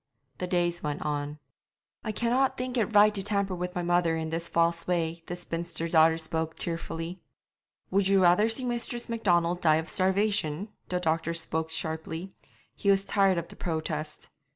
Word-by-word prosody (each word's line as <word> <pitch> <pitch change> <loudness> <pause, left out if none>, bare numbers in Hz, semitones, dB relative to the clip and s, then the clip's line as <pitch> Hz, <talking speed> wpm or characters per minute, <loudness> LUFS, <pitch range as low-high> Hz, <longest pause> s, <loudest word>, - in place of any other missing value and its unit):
The 180 - -2
days 175 -1 +1
went 150 -1 -3
on. 145 0 -2 0.7
'I 215 - -2
cannot 245 +4 +1
think 255 0 -3
it 225 -2 0
right 210 +1 +7
to 200 - -1
tamper 200 -1 0
with 180 +1 -4
my 175 - -1
mother 175 -1 +2
in 160 0 -3
this 170 +1 -3
false 170 0 +1
way.' 170 -2 0
The 175 - -3
spinster 170 -1 -3
daughter 160 0 +5
spoke 160 0 -3
tearfully. 165 +1 -4 0.7
'Would 195 0 +3
you 195 0 +4
rather 180 +5 +5
see 240 +3 -1
Mistress 240 0 -3
Macdonald 175 -6 +1
die 155 -2 +5
of 160 +1 -1
starvation?' 190 -2 +1 0.2
The 180 - 0
doctor 165 -1 0
spoke 160 -1 -1
sharply; 160 +3 -4 0.4
he 200 - 0
was 195 0 +4
tired 195 -3 +3
of 170 0 -3
the - - -11
protest. 155 -2 -4
175 Hz, 175 wpm, -28 LUFS, 160-195 Hz, 0.7 s, right